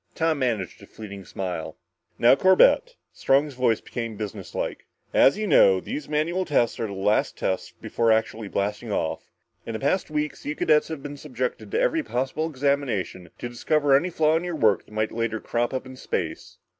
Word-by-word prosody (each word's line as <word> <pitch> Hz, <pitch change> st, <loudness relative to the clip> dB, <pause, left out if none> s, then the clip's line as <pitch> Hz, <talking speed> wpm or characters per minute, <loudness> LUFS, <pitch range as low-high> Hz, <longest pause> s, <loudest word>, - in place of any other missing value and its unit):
Tom 160 Hz, -2 st, +1 dB
managed 115 Hz, -8 st, -2 dB
a -, -, -13 dB
fleeting 100 Hz, -3 st, -9 dB
smile. 85 Hz, -4 st, -5 dB, 0.4 s
"Now, 120 Hz, -, +6 dB
Corbett" 190 Hz, -, +4 dB, 0.2 s
Strong's 140 Hz, +2 st, +2 dB
voice 125 Hz, -3 st, +1 dB
became 115 Hz, -3 st, -5 dB
businesslike 105 Hz, -2 st, -5 dB, 0.3 s
"as 135 Hz, -, +5 dB
you 215 Hz, -, -2 dB
know, 95 Hz, -, +5 dB
these 145 Hz, +9 st, -6 dB
manual 160 Hz, +5 st, 0 dB
tests 130 Hz, -8 st, +1 dB
are 115 Hz, -, -1 dB
the 100 Hz, -, -6 dB
last 100 Hz, +2 st, +1 dB
tests 95 Hz, -, -2 dB
before 115 Hz, -1 st, +1 dB
actually 110 Hz, -1 st, 0 dB
blasting 105 Hz, +3 st, -2 dB
off. 80 Hz, -5 st, -2 dB, 0.3 s
In 115 Hz, -, -6 dB
the 110 Hz, -, -3 dB
past 165 Hz, +7 st, 0 dB
weeks, 150 Hz, 0 st, -3 dB
you 150 Hz, -, -3 dB
cadets 150 Hz, 0 st, +3 dB
have 160 Hz, -4 st, -6 dB
been 145 Hz, 0 st, -7 dB
subjected 130 Hz, -3 st, -4 dB
to 445 Hz, -, 0 dB
every -, -, +2 dB
possible 135 Hz, -, -2 dB
examination, 130 Hz, -, -1 dB
to -, -, -5 dB
discover 140 Hz, +4 st, +2 dB
any 165 Hz, +7 st, +2 dB
flaw 155 Hz, -2 st, +2 dB
in 165 Hz, -, 0 dB
your 175 Hz, -2 st, -3 dB
work 110 Hz, -9 st, +2 dB
that -, -, -19 dB
might 110 Hz, 0 st, -1 dB
later 115 Hz, -1 st, -2 dB
crop 120 Hz, +2 st, -1 dB
up 130 Hz, 0 st, -3 dB
in 130 Hz, 0 st, -10 dB
space. -, -, -4 dB
130 Hz, 185 wpm, -25 LUFS, 110-150 Hz, 0.4 s, Now